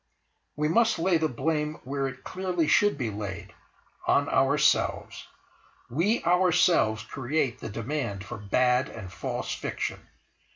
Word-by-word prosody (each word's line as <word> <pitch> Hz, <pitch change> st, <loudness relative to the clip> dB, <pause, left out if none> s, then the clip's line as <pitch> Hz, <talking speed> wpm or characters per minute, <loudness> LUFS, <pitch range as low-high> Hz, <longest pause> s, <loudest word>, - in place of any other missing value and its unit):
We 150 Hz, +1 st, 0 dB
must 225 Hz, +6 st, +3 dB
lay 170 Hz, 0 st, +2 dB
the 160 Hz, -, +2 dB
blame 150 Hz, +4 st, -1 dB
where 135 Hz, +1 st, -2 dB
it 130 Hz, 0 st, -9 dB
clearly 180 Hz, -4 st, -1 dB
should 205 Hz, -1 st, +4 dB
be 120 Hz, -6 st, -2 dB
laid, 100 Hz, -3 st, -6 dB, 0.5 s
on -, -, +3 dB
ourselves. -, -, +1 dB, 0.6 s
We 190 Hz, -, +1 dB
ourselves 175 Hz, -10 st, +3 dB
create 130 Hz, +1 st, -2 dB
the 115 Hz, -, -6 dB
demand 115 Hz, -2 st, -3 dB
for 120 Hz, 0 st, -7 dB
bad 125 Hz, +5 st, +2 dB
and 95 Hz, -5 st, -9 dB
false -, -, -3 dB
fiction. -, -, -4 dB
140 Hz, 130 wpm, -27 LUFS, 115-170 Hz, 0.6 s, should